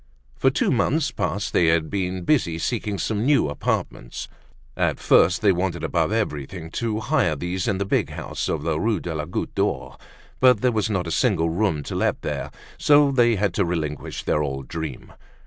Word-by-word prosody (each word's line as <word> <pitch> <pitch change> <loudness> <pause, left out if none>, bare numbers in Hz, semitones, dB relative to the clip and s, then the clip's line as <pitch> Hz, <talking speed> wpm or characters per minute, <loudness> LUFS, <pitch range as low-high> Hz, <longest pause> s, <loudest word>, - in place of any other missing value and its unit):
For - - +3
two - - +1
months 155 +2 +1
past 100 -1 -2
they 85 - +4
had 80 -1 +2
been 95 -2 -2
busy 85 - +1
seeking 105 +2 -2
some 105 +2 -1
new 140 - +3
apartments. - - -3 0.5
At - - 0
first 90 +4 +4
they 100 - +6
wanted 90 -2 -2
above 80 +2 0
everything 80 -5 -3
to 110 -2 -2
hire 125 - +1
these 90 +4 -3
in 100 - +1
the 100 - -1
big - - +1
house - - -4
of 75 -2 -2
the 80 -1 0
Rue 110 -1 +1
de 85 -1 -5
la 75 -1 -3
Goutte 90 - -4
d'Or. - - -2 0.4
But 125 -4 +5
there 125 - +3
was 110 -1 0
not 95 -4 -1
a 85 - -4
single 85 -10 +2
room 85 -5 0
to - - -6
let - - 0
there; - - -3 0.3
so 145 -1 +5
that 135 - -5
they 120 -1 +5
had 100 -2 0
to 100 - +1
relinquish 80 -4 -3
their 75 - +1
old 70 -2 -3
dream. 80 -6 -6
95 Hz, 200 wpm, -23 LUFS, 80-110 Hz, 0.5 s, they